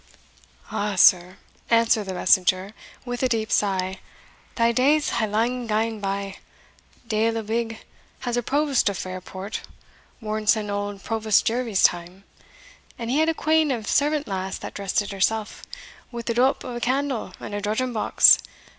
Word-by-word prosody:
"Ah 205 -1 -2
sir," 180 +1 +5 0.3
answered 230 -2 +3
the 190 -1 -5
messenger, 185 +2 +2 0.3
with 245 -1 -4
a 255 - +2
deep 220 -2 -1
sigh, 190 -2 0 0.6
"thae 230 -1 +3
days 285 +5 +2
hae 220 - 0
lang 235 +4 -1
gane 220 0 -1
by. 195 -1 -4 0.7
Deil 225 +1 +1
a 225 - -3
wig 225 +1 -2 0.4
has 245 -2 -2
a 245 - +1
provost 280 -2 +1
of 200 - -4
Fairport 185 +2 -6 0.6
worn 215 -1 -4
sin' 215 -2 +2
auld 205 -1 -4
Provost 220 -2 +1
Jervie's 230 -4 0
time 175 +2 +1 0.7
and 230 0 -4
he 280 - +2
had 315 +1 +3
a 325 - 0
quean 315 -1 +2
of 235 -5 -2
a - - -12
servant 295 -1 +1
lass 190 -1 -3
that - - -8
dressed 200 +1 -1
it 205 - -7
herself, 210 +2 -1 0.5
wi' 235 -1 -6
the 235 - -2
doup 255 +3 +1
o' 245 - -6
a - - -4
candle 265 0 -1
and - - -8
a 205 - -3
drudging 220 +5 -1
box. 215 - +6
220 Hz, 165 wpm, -24 LUFS, 200-245 Hz, 0.7 s, box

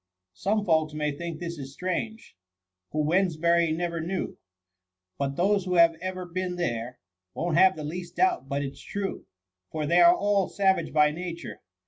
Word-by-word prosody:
' 90 - -61
Some 205 - 0
folks 160 -3 +2
may 150 -1 0
think 165 +2 -5
this 170 -2 -5
is 135 0 -9
strange^ 220 +5 -3 0.6
Who 155 0 -1
Wedneshiiry 170 -1 +2
never 170 -1 -2
knew^ 180 +4 -3 0.8
But 140 0 -1
those 195 +3 +2
who 180 -1 -1
have 170 -1 +6
ever 185 0 -4
been 180 +1 -3
there^ 120 -7 -2 0.4
Won't 170 0 +1
have 190 0 +6
the 155 - -6
least 170 +3 -6
doubt 370 -1 +1
but 140 +1 -1
it's 135 -1 -7
true. 200 -1 -5 0.4
For 155 +6 -3
they 170 +4 +4
are 175 0 +8
all 200 -1 +1
savage 190 -5 +1
by 150 -1 +4
nature. 170 +1 -6
170 Hz, 170 wpm, -27 LUFS, 155-185 Hz, 0.8 s, are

